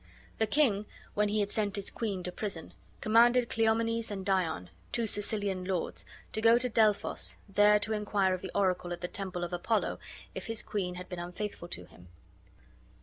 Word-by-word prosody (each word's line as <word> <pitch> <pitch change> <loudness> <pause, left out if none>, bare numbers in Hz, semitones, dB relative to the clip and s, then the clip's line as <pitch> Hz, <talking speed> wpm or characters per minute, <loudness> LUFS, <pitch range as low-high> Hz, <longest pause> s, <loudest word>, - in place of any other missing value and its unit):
The 220 - +3
king, 215 -6 +2 0.3
when 210 0 +2
he 210 +1 +1
had 205 - -1
sent 205 -2 0
his 200 -1 -1
queen 200 -5 -3
to 180 - -3
prison, 185 -4 -5 0.3
commanded 235 +2 +5
Cleomenes 225 0 +1
and 195 -2 -5
Dion, 170 - 0 0.2
two 235 - +1
Sicilian 205 -3 +1
lords, 185 -2 -2 0.3
to 220 - -1
go 230 +1 +7
to 250 +1 +1
Delphos, 215 -2 +2
there 205 +1 +5
to 210 +1 0
inquire 205 -3 +1
of 185 - -3
the 190 - -5
oracle 185 -3 +1
at 175 - -7
the 175 - -2
temple 185 -2 -4
of 175 0 -4
Apollo 215 +6 0 0.3
if - - -6
his 225 -1 -2
queen 180 -4 -2
had 180 0 -7
been 180 - -6
unfaithful 180 +1 -5
to 175 - -5
him. 90 - -17
205 Hz, 185 wpm, -31 LUFS, 185-220 Hz, 0.3 s, go